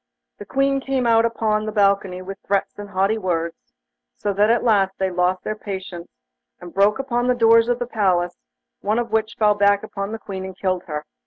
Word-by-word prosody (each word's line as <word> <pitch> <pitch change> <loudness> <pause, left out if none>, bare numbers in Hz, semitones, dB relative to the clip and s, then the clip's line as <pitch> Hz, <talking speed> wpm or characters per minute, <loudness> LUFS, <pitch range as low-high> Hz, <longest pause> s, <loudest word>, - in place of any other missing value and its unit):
The 205 - -9
Queen 275 0 +1
came 265 -2 -1
out 230 -1 +4
upon 215 -2 0
the - - -2
balcony 195 -3 +1
with 195 +1 -8
threats 200 +1 -1
and 205 0 -7
haughty 200 +3 +1
words, 170 -4 -3 0.5
so 205 - -2
that 205 +2 +3
at 235 0 +2
last 195 -4 +2
they 190 -1 -1
lost 180 +1 0
their 215 - -3
patience, 190 -4 -7 0.5
and 175 -1 -11
broke 200 +4 +3
open 245 -2 -1
the 250 - +3
doors 230 -1 +5
of 245 - +2
the 245 - -3
palace, 185 -6 0 0.4
one 210 +2 0
of 240 -1 -2
which 220 0 0
fell 210 -1 +3
back 200 0 +3
upon 200 -1 -5
the 225 - -4
Queen 195 -4 -7
and 190 0 -8
killed 185 -2 -1
her. 150 -2 -5
205 Hz, 210 wpm, -21 LUFS, 190-225 Hz, 0.5 s, doors